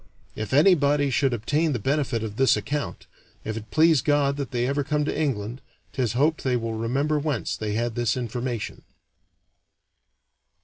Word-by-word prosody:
If 110 - -5
anybody 145 -2 +4
should 135 +1 +2
obtain 145 +7 0
the - - 0
benefit 130 -1 -1
of 105 -1 -6
this 130 -5 +4
account, 145 +8 -4 0.4
if 110 - -3
it 110 -1 -7
please 160 -2 +4
God 145 -2 +2
that 140 -3 -3
they 120 -1 -1
ever 140 +2 0
come 150 +1 0
to - - -2
England, 125 -5 -2 0.3
'tis 125 -5 0
hoped 150 +6 +1
they 125 -2 +1
will 115 -1 -3
remember 135 +7 0
whence 145 -5 -2
they 105 -1 -3
had 115 +2 -1
this 120 0 0
information." 120 -1 -4
130 Hz, 165 wpm, -25 LUFS, 115-145 Hz, 0.4 s, anybody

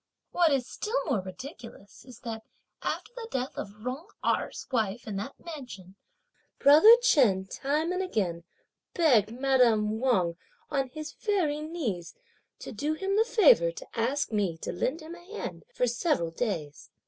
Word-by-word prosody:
What 345 -3 +3
is 270 -3 +1
still 445 - -2
more 255 - 0
ridiculous 205 - -11
is 250 -2 -13
that 225 -2 -5 0.4
after 435 - -3
the 475 -2 -7
death 260 - -3
of 210 +2 -8
Jung 260 +8 -4 0.2
Erh's - - -1
wife 225 -2 -1
in 210 -3 -4
that 210 +8 -5
mansion, 250 - -9 0.6
brother 310 +12 +8
Chen, 235 - +4
time 295 - -1
and 365 +1 -1
again, 185 - -2 0.5
begged 245 - +4
madame 235 -4 +2
Wang, 185 -10 +1 0.3
on 270 -2 0
his 305 +2 -7
very 345 -9 0
knees, 280 - -4 0.5
to - - -7
do 290 +7 -2
him 390 +4 -1
the 435 - +5
favour 485 +2 +5
to - - -9
ask 255 +5 -1
me 200 -6 0
to - - -2
lend 285 - -2
him 315 +2 -9
a 345 0 -12
hand - - -6
for 250 - +1
several 240 - 0
days. 165 -7 -4
260 Hz, 160 wpm, -28 LUFS, 210-320 Hz, 0.6 s, brother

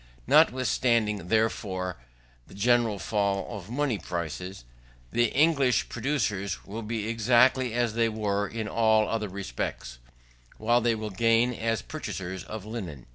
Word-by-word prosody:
Notwithstanding, 115 -6 +3
therefore, 95 -4 0 0.5
the - - -14
general 115 0 +2
fall 100 +1 0
of 100 -1 -9
money 130 -3 -1
prices, 85 -1 -5 0.5
the 120 - +3
English 140 -4 +3
producers 105 -7 -2
will 110 +3 -6
be 110 -1 -3
exactly 120 +2 +3
as 120 -2 +1
they 115 0 +2
were 105 -2 -1
in 110 0 -4
all 110 -1 +3
other 110 -2 -2
respects, 90 -10 -5 0.6
while 120 +3 +2
they 115 0 +2
will 110 -1 -5
gain 115 +4 +3
as 115 -1 -1
purchasers 95 - -5
of 105 0 -7
linen. 95 - -6
110 Hz, 130 wpm, -27 LUFS, 100-120 Hz, 0.6 s, Notwithstanding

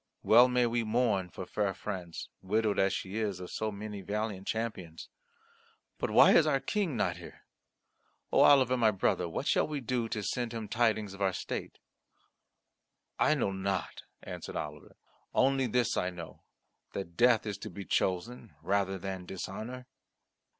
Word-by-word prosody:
Well 120 +3 +7
may 125 -1 +2
we 120 0 0
mourn 110 -5 +1
for 90 - -7
fair 100 0 -1
France, 90 -4 -6
widowed 105 +2 +1
as 95 0 +3
she 95 +3 -4
is 100 -4 -2
of 90 - -8
so 110 0 -2
many 105 0 -6
valiant 100 0 -3
champions. 100 -8 -4 0.9
But - - -1
why - - +7
is 155 - +6
our 140 -3 +2
King 185 - -1
not - - 0
here? - - -12 0.9
O - - +3
Oliver, 130 -3 +6
my 115 -3 +4
brother, 90 -3 0
what 80 - -4
shall - - +2
we 150 -2 -3
do 120 -2 -2
to 110 -3 -3
send 120 +4 -2
him 110 -2 -4
tidings 110 -3 +1
of 100 - -11
our 95 -1 +2
state?" - - -5 1.4
"I - - +4
know 100 - 0
not," 95 -1 -3 0.2
answered - - -7
Oliver. 75 -1 -6 0.4
"Only 135 0 +3
this 120 0 +1
I 90 - 0
know 85 -3 -9 0.5
that 85 -4 -5
death 120 +2 +4
is 105 -2 -4
to - - -6
be 100 -1 -8
chosen 105 +1 -1
rather 95 +1 0
than 95 -1 -6
dishonour." 110 +7 -6
105 Hz, 165 wpm, -31 LUFS, 95-120 Hz, 1.4 s, Well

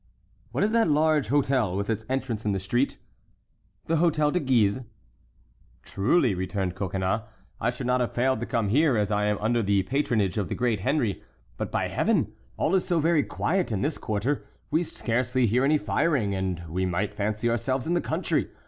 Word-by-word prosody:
"What - - 0
is 210 - +2
that 225 -6 +3
large 150 -4 +2
hôtel, 130 -8 +1
with 100 0 -2
its 110 -1 -2
entrance 130 -4 -2
in 105 - 0
the 95 - -1
street?" 120 +8 0 0.9
"The 165 - +1
Hôtel 155 -2 +2
de 180 - +2
Guise." 125 - +2 1.0
"Truly," 120 - +2
returned 95 0 -2
Coconnas, 95 +2 -1 0.4
"I - - +1
should 125 +1 -5
not 125 0 +2
have 120 - -1
failed 130 0 +1
to 120 - -4
come 115 -5 0
here, 140 +2 +3
as 105 -1 0
I 105 0 +1
am 105 0 +1
under 115 +2 +1
the 100 -2 +2
patronage 110 - 0
of 95 -6 -2
the - - -2
great 120 -4 0
Henry. 120 -2 0 0.3
But, - - -4
by - - 0
Heaven! - - +1 0.2
all 160 - +1
is 190 -2 +3
so 175 -3 +1
very 160 0 +3
quiet 180 +1 -1
in 105 0 -1
this 150 +2 -1
quarter, 110 +7 -1 0.3
we 160 - +3
scarcely 125 -4 0
hear 120 +4 +2
any 150 +3 +4
firing, 115 -1 0
and 95 -3 -2
we 90 +4 -2
might 100 +4 -1
fancy 105 +2 -1
ourselves 120 +3 0
in 170 - 0
the 175 - +2
country. - - -1
120 Hz, 195 wpm, -26 LUFS, 100-145 Hz, 1.0 s, any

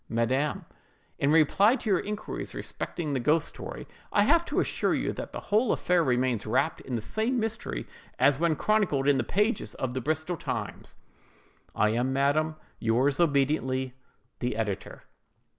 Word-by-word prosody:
"MADAM: 130 +6 0 0.5
In 140 - +2
reply 190 - +5
to 250 - -7
your 185 - +4
inquiries 210 +1 -5
respecting 155 -5 -4
the 135 - 0
ghost 150 +5 +2
story, - - -8 0.2
I 205 - +4
have 335 +8 +4
to - - -1
assure - - +1
you - - -1
that - - -6
the - - -5
whole 220 +3 +4
affair 180 -1 +2
remains 125 -5 0
wrapped 120 +4 +1
in 130 - -4
the 115 - -2
same 225 - -1
mystery 220 - -3 0.3
as 135 +2 +4
when 165 -2 +2
chronicled 185 -9 +1
in 145 -1 +5
the - - +1
pages 210 +3 0
of 130 -1 -3
the 130 - -2
Bristol 155 +5 -1
Times. - - -5 0.8
"I 105 - +3
am, 120 +4 0
madam, 145 +4 +1 0.2
yours 130 +6 +1
obediently, 135 -4 +1 0.5
"THE 125 -2 -2
EDITOR." 105 -4 -4
145 Hz, 160 wpm, -28 LUFS, 130-180 Hz, 0.8 s, reply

